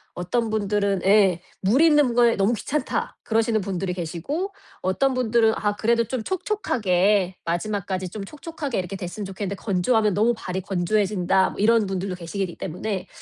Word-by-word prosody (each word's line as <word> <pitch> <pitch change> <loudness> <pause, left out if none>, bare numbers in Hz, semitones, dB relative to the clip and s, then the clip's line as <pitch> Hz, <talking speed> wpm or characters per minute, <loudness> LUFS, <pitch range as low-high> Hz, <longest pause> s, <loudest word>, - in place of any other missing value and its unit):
어떤 220 +6 -1
분들은 205 -2 0
예 195 -3 +5 0.2
"물 220 +10 +3
있는 295 -6 +5
게 235 -1 +4
너무 200 +3 +2
귀찮다." 265 +5 -2
그러시는 225 -1 +1
분들이 185 -1 -2
계시고 185 - -4 0.3
어떤 260 +9 +1
분들은 230 -3 +3
"아 205 -1 -1
그래도 235 +2 +2
좀 245 0 -3
촉촉하게 205 - +1
마지막까지 190 +1 -2
좀 200 +2 -6
촉촉하게 295 - -5
이렇게 185 +1 -4
됐으면 185 +3 -6
좋겠는데 195 +1 -4
건조하면 210 +2 +1
너무 225 +3 +3
발이 190 -3 -4
건조해진다." 190 0 +1
뭐 - - -10
이런 225 +1 +4
분들도 190 -1 -3
계시기 180 +1 -4
때문에 190 +3 -4
205 Hz, 380 characters per minute, -24 LUFS, 185-230 Hz, 0.3 s, 예